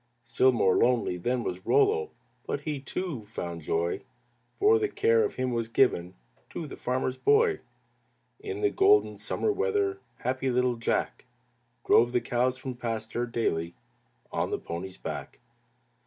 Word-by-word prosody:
Still 120 +2 +3
more 95 -6 +3
lonely 120 -7 +2
then 120 +7 -1
was 90 -2 -4
Rollo, 430 +1 +3 0.4
But - - -2
he, 150 -3 -3
too, 140 - -4
found 85 -6 -5
joy, 85 +3 -1 0.6
For 435 +2 +5
the 420 -1 0
care 450 +3 +3
of 425 - -2
him 130 -1 -1
was 115 -1 -2
given 90 -8 +2 0.3
To 165 - -5
the 145 - -8
farmer's 130 +1 -2
boy. 430 0 +3 0.8
In 410 -1 -5
the 410 -1 +2
golden 405 +2 +4
summer 430 - -1
weather, 405 -2 0 0.2
Happy 130 +1 -1
little 125 0 +2
Jack 115 - -1 0.6
Drove 120 +1 +5
the 125 - +3
cows, 125 +2 0
from 130 0 -5
pasture 115 0 -3
daily, 85 -8 -1 0.6
On - - -1
the - - -1
pony's 90 +3 -6
back. - - -6
125 Hz, 150 wpm, -28 LUFS, -, 0.8 s, For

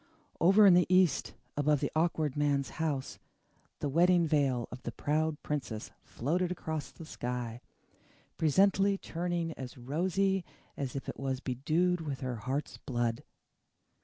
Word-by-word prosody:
Over 195 +5 +6
in 190 - +8
the 175 0 +5
east, 185 -5 +3 0.2
above 145 0 +2
the - - -2
Awkward 155 -3 +1
Man's 145 -2 +1
house, 145 -5 -2 0.6
the - - 0
Wedding 170 +4 +4
Veil 140 -6 +1
of 125 - -8
the - - -4
Proud 155 +1 0
Princess 130 -7 -4
floated 175 +8 -1
across 160 -4 -4
the 165 - -11
sky, 120 -4 -4 0.7
presently 195 +5 +3
turning 170 -2 -2
as 130 -3 -8
rosy 185 +9 0 0.3
as 135 -2 -4
if 135 - -5 0.4
bedewed 160 +8 +1
with 145 -4 -4
her 125 -2 -3
heart's 135 +6 -3
blood. 120 +1 -2
150 Hz, 130 wpm, -31 LUFS, 130-175 Hz, 0.7 s, in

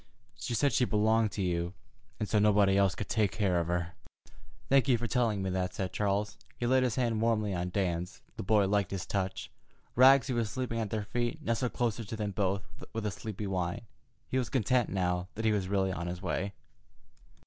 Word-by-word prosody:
She 120 - -3
said 140 +2 +2
she 125 - +3
belonged 110 0 +2
to 100 - -2
you, 85 0 -1 0.4
and 105 - -1
so 105 - +2
nobody 100 -2 +4
else 100 -1 +3
could 100 - -4
take 110 -4 +1
care 95 -5 +1
of 85 - -2
her." 85 0 -1 0.7
"Thank 135 0 +4
you 125 -3 +4
for 120 - -3
telling 115 -5 +1
me 95 - -1
that," 90 0 -2
said 95 -2 -3
Charles. 105 0 -1 0.2
He 120 - -2
laid 130 +2 +4
his 125 -3 +1
hand 115 -4 0
warmly 110 -3 +1
on 90 0 -2
Dan's. 90 -2 -2
The - - -5
boy 105 0 +3
liked 100 -2 +1
his 95 -3 -4
touch. 95 -1 -3 0.4
Rags, 130 0 +7
who 130 - -2
was 115 -3 0
sleeping 120 0 -3
at 110 -2 -2
their 110 0 -2
feet, 120 +7 -2
nestled 120 0 -1
closer 115 -1 -1
to 110 +1 -6
them 105 -2 -2
both 95 0 0 0.3
with 110 -1 -3
a 105 - 0
sleepy 105 0 -6
whine. 90 -3 -2 0.5
He 130 - 0
was 125 - -2
content 125 -1 +2
now 90 -1 -1
that 110 +1 -3
he 110 - +4
was 100 -3 0
really 95 -1 +1
on 85 -1 -4
his 90 0 -4
way. 95 +2 -2
105 Hz, 215 wpm, -31 LUFS, 95-115 Hz, 0.7 s, Rags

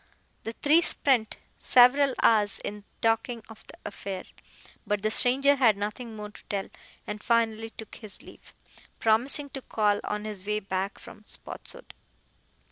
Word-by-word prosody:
The 225 - -4
three 300 +7 +4
spent 260 -9 +1 0.2
several 260 +2 +5
hours 210 -3 +4
in 205 0 -6 0.2
talking 225 +1 +1
of 225 - -13
the - - -11
affair, 195 -2 -5 0.6
but 210 -1 -1
the 215 - +1
stranger 270 +5 +4
had 230 -6 +4
nothing 220 +3 -5
more 210 -1 -7
to - - -15
tell, 200 -1 -3 0.4
and 210 0 -5
finally 225 -1 +1
took 220 -1 -11
his 215 -3 -11
leave, - - -15 0.4
promising 255 +6 +2
to 270 0 -7
call 210 -4 +1
on 210 0 -3
his 210 -3 -5
way 210 +1 -1
back 195 0 -3
from 215 - -13
Spotswood. - - -4
220 Hz, 150 wpm, -27 LUFS, 210-245 Hz, 0.6 s, several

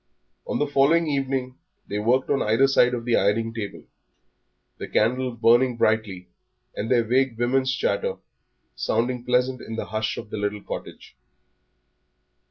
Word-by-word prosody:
On - - -1
the 150 - +1
following 145 +4 +3
evening 135 -3 -2 0.3
they 105 - -3
worked 125 +6 +1
on 140 - +2
either 115 +6 +3
side 125 -2 +3
of 115 -1 -6
the 120 - +2
ironing 115 +3 +1
table, 110 -3 -6 1.0
the - - -5
candle 125 +4 +1
burning 120 +2 +3
brightly 105 -6 0 0.5
and 110 - -4
their 120 -2 +3
vague 125 +1 +1
woman's 130 +2 +1
chatter 130 -6 -1 0.6
sounding 120 +1 -1
pleasant 125 +1 0
in 115 - -7
the - - -4
hush 110 0 -2
of 105 - -8
the - - -4
little 105 0 -3
cottage. - - -8
120 Hz, 150 wpm, -24 LUFS, 110-130 Hz, 1.0 s, following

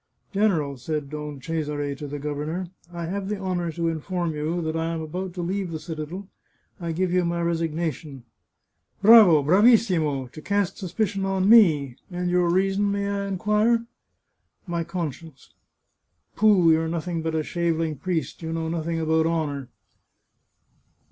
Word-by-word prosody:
" - - -41
General," 170 -10 +1
said 145 +2 -4
Don 150 -2 -6
Cesare 145 -1 -3
to 145 +1 -7
the 145 +1 -5
governor, 150 +5 -4
" 170 - -28
I 170 -1 -5
have 195 +3 -4
the 210 - -2
honour 180 -3 -2
to 170 0 -1
inform 165 +1 -2
you 155 +3 -2
that 160 0 -2
I 165 0 -1
am 165 -1 -3
about 180 +3 -5
to 175 - -3
leave 190 +1 -2
the 165 - -4
cita 155 -2 -6
del. 185 +5 -8 0.5
I 170 -2 -3
give 180 +2 -1
you 180 0 +3
my 170 0 -1
resignation," 165 -4 -2 0.4
" - - -47
Bravo! 200 -9 +8
Bravissimo!... 180 - +3
to 155 - -10
cast 200 +1 -1
suspicion 195 +1 -2
on 195 0 0
me! 155 - +5
And 180 -1 -2
your 180 -1 +3
reason, 195 +3 +2
may 200 0 -1
I 200 0 -2
inquire? 210 +4 +1 0.3
" - - -51
" - - -47
My 170 - 0
conscience." 160 -4 -6 0.4
" 85 0 -48
Pooh! 200 -6 +5
you're 160 0 +2
nothing 170 0 -3
but 160 0 -2
a 155 - 0
shaveling 165 -2 -1
priest. 165 -2 -3
You 160 -1 -4
know 165 0 -2
nothing 165 0 -2
about 160 0 +2
honour." 145 -5 -2
170 Hz, 175 wpm, -24 LUFS, 155-185 Hz, 0.5 s, Bravo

